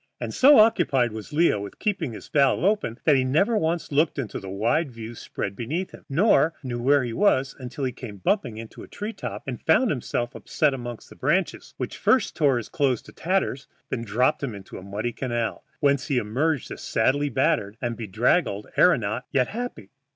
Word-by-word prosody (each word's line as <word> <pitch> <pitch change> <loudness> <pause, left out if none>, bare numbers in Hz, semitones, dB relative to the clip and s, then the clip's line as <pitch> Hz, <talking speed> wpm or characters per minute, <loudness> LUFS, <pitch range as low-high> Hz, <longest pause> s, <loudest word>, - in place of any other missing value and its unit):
And - - -4
so 280 +2 +7
occupied 175 - +4
was 110 +4 -8
Leo 155 -7 +3
with 100 - -8
keeping 190 - -1
this 110 - -9
valve 140 +1 +2
open 195 - +1
that 150 - +5
he 130 - +3
never 165 - +2
once 165 -4 -1
looked 150 +3 +2
at 130 -6 -3
the 95 - -6
wide 115 - 0
view 115 0 -8
spread 100 -3 -5
beneath 155 - -3
him, - - -14
nor 165 +1 +3
knew 120 -2 -4
where 140 +2 +4
he 120 -2 -4
was 135 - +2
until 130 +2 -6
he 130 - 0
came 115 -4 -9
bumping 120 - 0
into 115 0 -9
a - - -10
treetop, 210 +2 -6
and - - -5
found 260 - +3
himself 120 -2 -2
upset 150 -3 0
among 120 -2 -5
the - - -14
branches, 170 +8 -1
which - - -4
first 260 - +2
tore 140 -5 +3
his 120 - -4
clothes 130 -5 0
to - - -14
tatters 180 -7 -1 0.2
and - - -1
then - - -5
dropped 120 +5 +1
him 130 -7 -3
into 100 -1 -9
a - - -11
muddy 105 +5 -4
canal, 120 -3 -3 0.2
whence 140 -2 +2
he 140 - +1
emerged 130 +6 0
a - - -6
sadly 145 +6 +1
battered 105 -4 0
and 120 -1 -2
bedraggled 110 - 0
aëronaut, 115 - +3
yet 130 -2 +1
happy. 230 - -6
130 Hz, 200 wpm, -25 LUFS, 115-160 Hz, 0.2 s, so